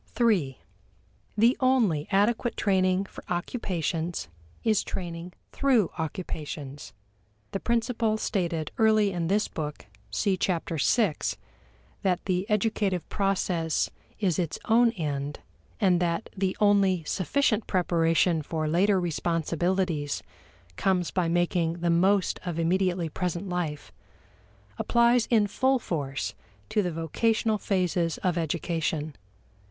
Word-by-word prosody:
3. 190 - +2 0.8
The 230 +4 +5
only 230 - +2
adequate 220 +4 +1
training 190 -1 +2
for - - -11
occupations 175 - -2 0.3
is 215 -3 +2
training 175 -1 -6 0.2
through 255 - +2
occupations. 150 -3 -5 0.6
The 195 - -2
principle 230 -1 0
stated 170 -7 -2
early 215 -2 +4
in 175 -2 -2
this 205 +4 +2
book 150 -2 -5 0.2
(see 195 -3 0
Chapter 170 -3 -1
VI) 210 -11 +3 0.8
that 185 -2 0
the 185 +2 -1
educative 210 -4 0
process 185 -5 0 0.3
is 190 -5 0
its 170 -4 -1
own 235 +1 +5
end, 145 - -3 0.4
and 185 -5 +3
that 170 +3 -1
the 190 -1 -1
only 200 -4 +3
sufficient 215 - 0
preparation 165 -2 +2
for 155 +1 -2
later 190 +5 +3
responsibilities 170 -1 -1 0.5
comes 185 -3 +1
by 180 -3 0
making 175 -1 +1
the 170 0 +2
most 190 +3 +2
of 175 -3 -4
immediately 175 +1 +1
present 175 +3 -3
life, 170 -5 -3 0.9
applies 235 0 +3
in 220 -3 +4
full 260 +6 +2
force 140 - -3 0.4
to 210 - +2
the 180 -3 -1
vocational 215 +7 0
phases 180 -4 0
of 180 -3 +1
education. 160 -2 -2
180 Hz, 115 wpm, -27 LUFS, 165-205 Hz, 0.9 s, The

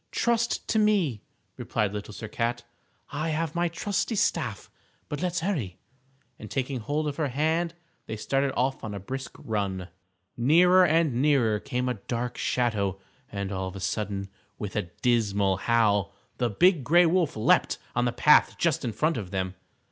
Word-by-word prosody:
"Trust 235 0 0
to 220 - +2
me," 190 - +2 0.4
replied 105 -2 -1 0.2
Sir 105 +2 -7
Cat, 115 +3 -2 0.5
"I 155 +2 -2
have 160 0 -1
my 175 0 +1
trusty 200 +6 -2
staff. - - -1 0.4
But 145 - -4
let's 175 -1 -1
hurry," 145 - -2 0.6
and 110 - -9
taking 130 -1 -2
hold 150 +7 -2
of 145 - -3
her 155 -3 0
hand 160 +5 0 0.3
they 110 - -4
started 135 +5 0
off 130 +2 0
on 105 -2 -5
a - - -4
brisk 130 +5 -6
run. 95 -4 -3 0.5
Nearer 175 +9 +5
and 155 -6 +2
nearer 130 -8 +3
came 125 +3 -2
a 125 - +1 0.2
dark 120 0 -2
shadow, 105 -6 0 0.3
and 100 -1 -4
all 95 -1 -2
of 95 - -8
a - - -6
sudden, 100 +1 -3 0.3
with 100 -3 -6
a 85 - -2
dismal 100 -6 +2
howl, 105 -3 +2 0.2
the 120 -2 +1
Big 170 - +3
Gray 175 +7 +5
Wolf 170 -2 +2
leaped 110 - +3 0.2
on 120 0 +2
the 120 - +1
path 150 +5 +5
just 165 -4 +1
in 120 -3 -2
front 155 +9 +1
of 100 -5 -5
them. 95 -1 -2
125 Hz, 170 wpm, -27 LUFS, 105-160 Hz, 0.6 s, Nearer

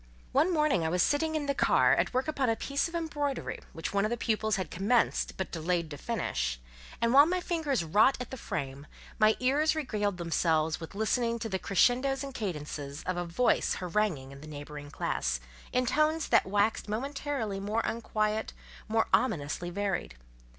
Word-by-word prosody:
One 305 +7 +3
morning 300 - +2
I 160 - +1
was 180 +1 +2
sitting 315 +2 +1
in 305 -2 -1
the 280 - +1
carré, - - +4
at - - +1
work 260 +3 0
upon 275 -5 0
a 225 - +2
piece 280 +6 -1
of 335 - -8
embroidery 295 -4 -2
which 165 +3 -5
one 200 0 +2
of 215 - +1
the 240 - -1
pupils 220 -1 0
had 185 -5 -4
commenced 215 +6 +1
but 190 - -3
delayed 170 -1 -1
to 145 - -6
finish, 225 - -2 0.4
and 235 +1 +2
while 285 +3 +8
my 365 +1 +1
fingers 320 - -1
wrought 210 - +4
at 250 - -6
the - - -4
frame, 140 - -5 0.3
my 215 0 +5
ears 290 +5 +2
regaled 210 - -1
themselves 160 -2 +1
with 165 +3 -9
listening 230 +2 +1
to 225 -1 -4
the 190 -2 -1
crescendos 255 +8 +2
and 275 -1 -6
cadences 150 - -5
of 185 - -2
a 175 0 -2
voice 175 +9 +2
haranguing 175 -7 -1
in 140 0 -11
the 155 - -10
neighbouring 145 -1 -8
classe, 60 - -1 0.3
in 250 0 +1
tones 305 +5 +1
that - - +4
waxed 205 +2 +1
momentarily 265 -3 -2
more 210 +3 -1
unquiet, 215 -1 -1 0.4
more 225 0 +2
ominously 175 - +1
varied. 190 - -2
215 Hz, 185 wpm, -30 LUFS, 175-270 Hz, 0.4 s, while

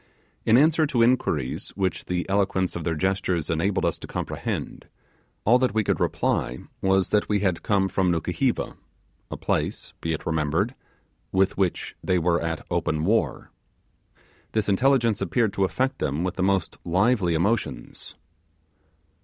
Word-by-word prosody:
In 115 - +6
answer 155 +2 +4
to 120 -4 +2
inquiries 85 - +1
which 95 -2 -1
the 90 -1 -2
eloquence 95 -2 +1
of 85 - -4
their 85 -1 -1
gestures 95 -1 0
enabled 90 +5 +1
us - - 0
to - - -8
comprehend, - - -4 0.6
all 120 +4 +5
that 125 -4 +1
we 110 - +3
could - - 0
reply - - 0 0.2
was, 95 -1 +2
that 105 - +1
we 105 -2 +2
had 95 -4 0
come 100 -2 +2
from 95 0 +1
Nukuheva, 80 -2 -1 0.5
a - - -5
place, - - -2
be 80 - -1
it 80 - -5
remembered, 80 - 0 0.6
with 95 0 +2
which 95 -3 -1
they 90 - +2
were 85 0 +2
at 80 -1 -3
open 75 +1 0
war. 110 +5 0 1.0
This 110 -2 0
intelligence 115 0 +3
appeared 100 +3 +1
to 100 - +2
affect 130 +7 -1
them 75 +4 -1
with 90 -1 -1
the - - -4
most 95 -2 0
lively 95 0 +2
emotions. 105 +7 -2
95 Hz, 155 wpm, -25 LUFS, 85-110 Hz, 1.0 s, In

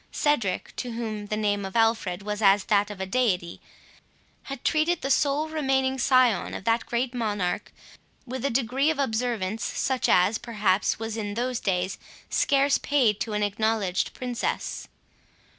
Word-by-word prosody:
Cedric, 265 -11 0
to 245 -2 -4
whom 215 -3 -4
the 215 - -2
name 205 -1 0
of 190 +2 -6
Alfred 225 -5 +1
was 210 +1 -3
as 200 -1 +5
that 205 0 +2
of 205 -2 -8
a 190 - -2
deity, 190 -5 0 0.8
had 275 -3 -7
treated 320 +2 +2
the 275 - 0
sole 290 +2 +2
remaining 265 -4 0
scion 250 -6 +3
of - - -6
that 230 +2 +1
great 240 +2 -1
monarch 210 -7 -2 0.5
with 255 0 -5
a 280 - +1
degree 265 +4 +1
of 320 - 0
observance, 225 -5 -1
such 260 -2 -1
as, 185 +5 +4
perhaps, 210 -4 0
was 225 0 -4
in 205 -2 -4
those 245 +1 -1
days 185 -1 -1 0.3
scarce 280 0 +3
paid 245 -8 +2
to 220 - -3
an 210 0 0
acknowledged 205 -2 0
princess. 250 -2 -3
225 Hz, 160 wpm, -26 LUFS, 205-260 Hz, 0.8 s, as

